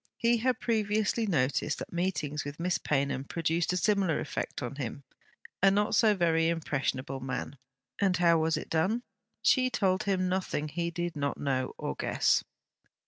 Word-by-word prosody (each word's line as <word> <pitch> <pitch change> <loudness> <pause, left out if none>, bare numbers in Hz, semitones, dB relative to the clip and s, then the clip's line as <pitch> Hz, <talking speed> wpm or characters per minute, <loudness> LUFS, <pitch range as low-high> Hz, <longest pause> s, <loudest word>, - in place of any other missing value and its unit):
He 235 0 +3
had 250 +1 0
previously 220 0 +1
noticed 145 -3 +1
that - - -7
meetings 155 -5 -1
with 145 +2 -7
Miss 180 +1 0
Paynham 140 -2 0
produced 165 +3 -1
a 180 - 0
similar 195 -4 +2
effect 145 - -4
on 125 +3 -5
him, 140 +1 -5 0.6
a 195 - +7
not 205 +2 +1
so 215 -2 +5
very 165 -3 +2
impressionable 135 -5 -2
man. 130 +1 -5 0.4
And 190 -3 +2
how 170 -1 +4
was 160 0 +1
it - - -7
done? 195 +9 +1 0.4
She 255 -1 +4
told 190 -5 +1
him 185 -2 +1
nothing 180 -5 -1
he 170 +2 -2
did 175 0 -3
not 140 -1 -2
know 130 -2 -1
or - - -3
guess. - - +1
170 Hz, 165 wpm, -30 LUFS, 145-195 Hz, 0.6 s, a